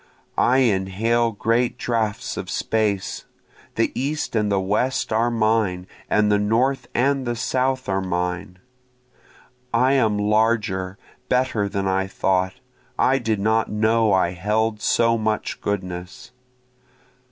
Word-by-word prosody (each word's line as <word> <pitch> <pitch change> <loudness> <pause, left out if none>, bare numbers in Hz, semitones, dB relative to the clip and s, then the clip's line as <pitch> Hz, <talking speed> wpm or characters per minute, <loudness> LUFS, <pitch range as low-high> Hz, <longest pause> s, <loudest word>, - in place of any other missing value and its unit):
I 125 - +4
inhale 115 +1 +1
great 115 +3 0
draughts 110 -3 -2
of - - -6
space, 105 -4 -1 0.5
The - - +1
east 145 0 -2
and 105 -2 +1
the 100 - +2
west 105 +7 0
are 115 +2 +2
mine, 110 -5 +1 0.2
and 105 0 +3
the 105 - +3
north 120 +6 +1
and 135 +1 +1
the 120 - -1
south 130 +2 -1
are 95 -1 0
mine. 90 0 -3 1.1
I 130 +3 +3
am 110 -6 +2
larger, 105 -3 +1 0.3
better 125 -5 +1
than 100 -1 -2
I 95 0 0
thought, 95 -1 0 0.4
I 135 +1 +3
did 110 -4 -1
not 110 +2 +1
know 110 +1 +2
I 95 -2 +2
held 105 +4 -1
so 115 +2 +2
much 110 0 -2
goodness. 90 -1 -5
110 Hz, 130 wpm, -22 LUFS, 95-120 Hz, 1.1 s, I